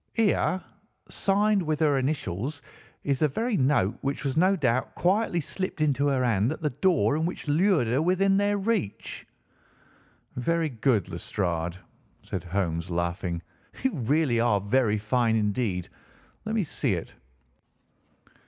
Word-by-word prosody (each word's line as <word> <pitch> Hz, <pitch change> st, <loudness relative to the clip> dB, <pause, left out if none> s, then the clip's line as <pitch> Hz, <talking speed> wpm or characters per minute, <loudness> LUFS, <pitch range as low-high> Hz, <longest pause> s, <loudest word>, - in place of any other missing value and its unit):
Here, 205 Hz, -4 st, +2 dB, 0.5 s
signed 205 Hz, +1 st, +2 dB
with 155 Hz, -3 st, -1 dB
her 150 Hz, -3 st, +3 dB
initials, 135 Hz, -, -3 dB, 0.4 s
is 140 Hz, -2 st, 0 dB
the 155 Hz, -, +4 dB
very 225 Hz, -, -1 dB
note 130 Hz, -, +2 dB
which 140 Hz, +1 st, -2 dB
was 135 Hz, -1 st, -1 dB
no 185 Hz, +4 st, +4 dB
doubt 130 Hz, -7 st, 0 dB
quietly 185 Hz, -1 st, +1 dB
slipped 185 Hz, +4 st, -4 dB
into 145 Hz, -2 st, +2 dB
her 135 Hz, -2 st, +1 dB
hand 115 Hz, +1 st, +2 dB
at 155 Hz, -, -5 dB
the 150 Hz, -, +1 dB
door 165 Hz, +1 st, +2 dB
and 160 Hz, +2 st, 0 dB
which 175 Hz, -, -6 dB
lured 165 Hz, -1 st, +3 dB
her 125 Hz, +5 st, +1 dB
within 190 Hz, +3 st, +3 dB
their 205 Hz, 0 st, +2 dB
reach." 200 Hz, -, -2 dB, 1.1 s
"Very 165 Hz, +6 st, 0 dB
good, 115 Hz, -, +1 dB
Lestrade," 85 Hz, -3 st, -2 dB, 0.5 s
said -, -, -4 dB
Holmes, 85 Hz, -2 st, -2 dB
laughing. 85 Hz, 0 st, -2 dB, 0.4 s
"You 265 Hz, -, +1 dB
really 135 Hz, -2 st, +1 dB
are 115 Hz, -3 st, +3 dB
very 110 Hz, +1 st, +2 dB
fine 110 Hz, +2 st, +1 dB
indeed. 105 Hz, -4 st, 0 dB, 0.6 s
Let 220 Hz, +1 st, -2 dB
me 215 Hz, -, +2 dB
see 135 Hz, -, -1 dB
it." 85 Hz, -, -6 dB
140 Hz, 145 wpm, -27 LUFS, 105-175 Hz, 1.1 s, the